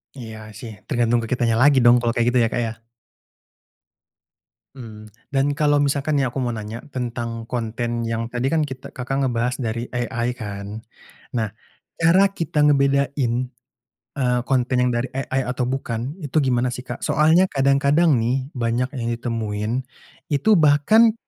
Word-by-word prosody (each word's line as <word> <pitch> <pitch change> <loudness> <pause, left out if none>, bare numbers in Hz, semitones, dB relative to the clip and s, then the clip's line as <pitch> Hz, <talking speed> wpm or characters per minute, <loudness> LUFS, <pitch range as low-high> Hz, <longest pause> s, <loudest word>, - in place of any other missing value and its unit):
Iya 110 -4 -8 0.2
sih, 115 - -8 0.2
tergantung 120 -3 +2
ke - - -5
kitanya 120 -2 +1
lagi 145 0 +6
dong 120 - +8
kalau 120 -1 0
kayak 120 -1 +1
gitu 125 0 +2
ya 115 - +1
Kak, 120 - 0
ya. - - -3 2.0
Mmm, 110 -4 -10 0.2
dan 140 +1 +1
kalau 145 0 +3
misalkan 145 +1 +1
nih 135 - +2
aku 125 - -6
mau 120 - -1
nanya, 110 0 -6
tentang 115 -2 -4
konten 120 0 -3
yang 115 0 -2
tadi 125 +3 -2
kan 160 -1 +2
kita 130 -1 -9
Kakak, 135 +2 -2
ngebahas 125 0 0
dari 115 +1 -3
AI 120 0 -2
kan, 105 -1 -7 0.5
nah, 110 -3 -1 0.5
cara 185 +4 +4
kita 160 -5 -1
ngebedain, 140 -3 +2 0.9
eee, 125 -2 +1
konten 125 -1 +1
yang 125 - +2
dari 120 0 0
AI 135 0 -2
atau 125 0 -2
bukan 130 +2 -3
itu 145 +2 -2
gimana 125 -2 +1
sih 125 - -6
Kak? 120 -1 -6
Soalnya 160 +5 +4
kadang-kadang 140 +3 +3
nih 130 +4 -1
banyak 120 +2 0
yang 115 -2 -3
ditemuin, 110 -3 -3 0.6
itu 200 +9 +4
bahkan 165 +10 +5
125 Hz, 155 wpm, -22 LUFS, 115-140 Hz, 2.0 s, dong